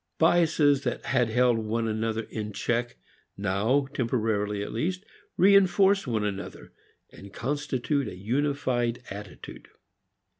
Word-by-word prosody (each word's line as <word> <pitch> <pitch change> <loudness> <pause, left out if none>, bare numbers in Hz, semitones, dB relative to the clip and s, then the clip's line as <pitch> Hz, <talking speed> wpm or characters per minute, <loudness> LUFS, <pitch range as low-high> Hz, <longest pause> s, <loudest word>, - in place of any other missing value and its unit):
Biases 160 -4 +3
that - - -3
had 125 -3 +1
held 120 0 +3
one 115 +1 -2
another 110 +1 -2
in 105 -1 -6
check 120 +2 -2 0.4
now, 105 +8 +1
temporarily 110 -5 -1
at - - -6
least, 180 - -2 0.3
reinforce 195 -1 +4
one 110 -3 0
another, 100 -1 -6 0.4
and 100 0 -13
constitute 140 +2 -2
a 100 - -7
unified 125 +1 -1
attitude. 100 0 -9
120 Hz, 115 wpm, -27 LUFS, 110-145 Hz, 0.4 s, reinforce